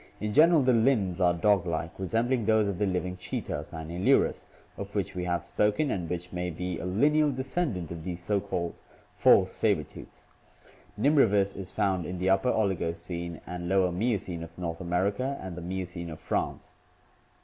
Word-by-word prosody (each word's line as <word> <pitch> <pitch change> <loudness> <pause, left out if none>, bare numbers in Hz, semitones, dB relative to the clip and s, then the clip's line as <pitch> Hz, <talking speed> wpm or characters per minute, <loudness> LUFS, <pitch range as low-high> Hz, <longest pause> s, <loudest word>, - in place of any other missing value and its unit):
In 105 0 -2
general, 160 +1 +6
the 130 0 +4
limbs 110 -7 +2
are 90 -1 +5
dog 100 0 +2
like, 80 +1 -3
resembling 115 +5 0
those 110 -2 +4
of 100 -2 -3
the 105 - +2
living 90 0 -2
cheeta 90 - -4
{Cynalurus) 85 +4 0 0.3
of 100 +1 -8
which 100 -2 -1
we 90 -1 -3
have 85 -1 -1
spoken 105 +8 +1
and 85 -4 -3
which 90 +1 -5
may 90 0 -2
be 90 +1 -4
a - - -5
lineal 150 +10 +3
descendant 130 - -2
of 85 -2 -6
these 90 0 -4
so 100 +3 0
called 90 -4 -4 0.3
"false 95 -1 +5
saber 100 -8 +1
tooths." - - -14 0.7
Nimravus 105 -7 +3
is 95 -1 -7
found 95 -5 0
in 90 - -4
the 95 +2 +1
Upper 95 +6 +3
Oligocene 85 -4 -2
and 85 0 -5
Lower 95 -1 +3
Miocene 95 -3 -1
of 85 0 -10
North 85 -1 -4
America 100 +10 0
and 95 -2 -7
the 90 - -7
Miocene 90 -1 -5
of 80 -1 -8
France. - - -3
95 Hz, 175 wpm, -28 LUFS, 85-105 Hz, 0.7 s, general